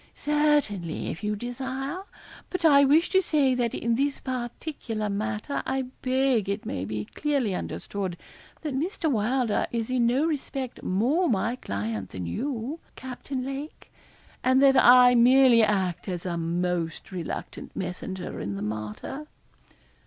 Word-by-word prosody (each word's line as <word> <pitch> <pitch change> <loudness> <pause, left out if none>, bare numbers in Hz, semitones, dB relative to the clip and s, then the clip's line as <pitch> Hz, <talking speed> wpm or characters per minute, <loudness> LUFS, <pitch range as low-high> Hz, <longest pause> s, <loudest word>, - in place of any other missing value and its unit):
'Certainly, 295 - +1
if 185 - -8
you 210 0 0
desire; 260 - -4 0.5
but 365 -2 -2
I 280 -3 +7
wish 300 +5 +5
to 380 0 +4
say 290 -7 +2
that 240 -2 0
in 235 0 0
this 275 +4 0
particular 240 -3 -4
matter 215 +6 -2
I 265 -1 -2
beg 255 -5 +2
it 200 +1 -2
may 90 - -3
be 105 +1 -4
clearly 280 -9 0
understood 185 0 -4 0.5
that 300 -3 -2
Mr. 315 +2 -1
Wylder 235 0 +1
is 230 0 -2
in 245 -2 +3
no 260 +6 +2
respect 270 -5 -3
more 265 - +1
my 225 +3 +1
client 105 - -4
than 90 -2 -6
you, 260 - -3 0.2
Captain 260 0 -5
Lake, 275 +3 -7 0.5
and 260 +1 +4
that 270 -1 +6
I 250 -1 +8
merely 245 0 +6
act 195 -5 +1
as 180 -2 -4
a 175 -2 -2
most 170 0 -2
reluctant 175 -4 -6
messenger 180 0 -5
in 100 +2 -3
the 100 - -4
matter.' 110 - -5
245 Hz, 145 wpm, -26 LUFS, 190-270 Hz, 0.5 s, I